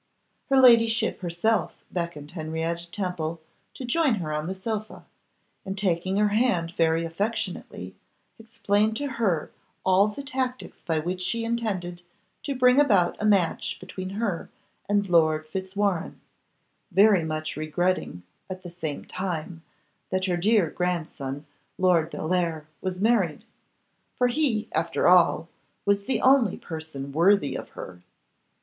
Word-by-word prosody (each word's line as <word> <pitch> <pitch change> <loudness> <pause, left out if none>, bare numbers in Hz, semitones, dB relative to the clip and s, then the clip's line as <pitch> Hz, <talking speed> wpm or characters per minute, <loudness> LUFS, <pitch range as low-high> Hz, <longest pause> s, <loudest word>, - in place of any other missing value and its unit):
Her 270 -1 +5
ladyship 230 -3 +5
herself 180 +6 0 0.2
beckoned 170 -4 -4
Henrietta 165 +1 -3
Temple 170 -4 -3 0.4
to 260 - -6
join 290 -1 +2
her 160 -6 -4
on 150 +1 -2
the 190 - -3
sofa, 215 +2 -5 0.6
and, 195 +1 -5
taking 185 0 0
her 210 0 +3
hand 205 -7 +1
very 165 0 +2
affectionately, 180 - -4 0.5
explained 220 -1 0
to 285 - -3
her 220 - -1 0.3
all 190 +2 +5
the 215 +7 -6
tactics 260 -2 -4
by 165 -2 -1
which 180 +4 -2
she 230 +5 -1
intended 195 -7 -2 0.4
to 280 - -3
bring 250 +1 +5
about 200 -12 +4
a - - 0
match 195 -5 +1
between 185 0 -7
her 205 -7 -2 0.4
and 205 -1 +2
Lord 155 -3 +3
Fitzwarrene, 190 +1 -2 0.7
very 195 -1 +5
much 155 0 -3
regretting, 155 - -1 0.3
at 185 0 -7
the 175 - -8
same 160 -4 -5
time, 175 -3 -4 0.5
that 185 0 0
her 180 -2 +1
dear 190 -1 +2
grandson, 155 -6 -3 0.3
Lord 175 -4 +3
Bellair, 165 -2 -1 0.2
was 185 -1 -3
married; 205 -7 +2 0.7
for 250 0 +3
he, 245 -5 0
after 165 +1 0
all, 175 -2 +5 0.4
was 200 0 +2
the 265 - 0
only 260 -6 +4
person 155 -4 -7
worthy 170 +1 +3
of - - -6
her. 90 -1 -8
185 Hz, 135 wpm, -26 LUFS, 165-215 Hz, 0.7 s, Her